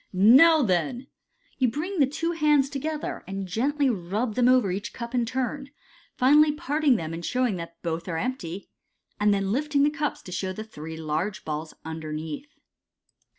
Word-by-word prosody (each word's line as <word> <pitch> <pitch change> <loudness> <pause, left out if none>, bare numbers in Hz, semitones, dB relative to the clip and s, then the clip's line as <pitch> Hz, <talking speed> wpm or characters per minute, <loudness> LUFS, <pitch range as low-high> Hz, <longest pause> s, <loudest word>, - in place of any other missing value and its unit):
" - - -45 0.3
Now, 325 -3 +6
then! 185 +3 0
n 270 - -20 0.5
You 255 - +4
bring 340 - -4
the 275 - +5
two 330 +5 -2
hands 300 -4 +2
to 280 - -3
gether, 310 +1 -4
and 195 0 -4
gently 275 +9 +1
rub 215 +1 -1
them 245 +2 +3
over 250 -7 +4
each 195 +3 -4
cup 235 0 -7
in 240 -2 +1
turn 260 +3 -2
j 280 - -27 0.4
finally 295 +4 +5
parting 300 -3 +1
them 165 -6 -3
and 170 +1 -6
showing 250 -1 0
that 170 0 -8
both 165 0 -3
are 165 -2 -2
empty, 200 -4 -4 0.5
and 205 0 +4
then 195 -1 0
lifting 285 +3 +1
the 295 - +3
cups, 295 0 -3
show 185 +1 -2
the 215 - -6
three 160 -7 -9
large 160 +6 -3
balls 155 +1 -5
underneath. 160 - -5
235 Hz, 185 wpm, -26 LUFS, 175-285 Hz, 0.5 s, Now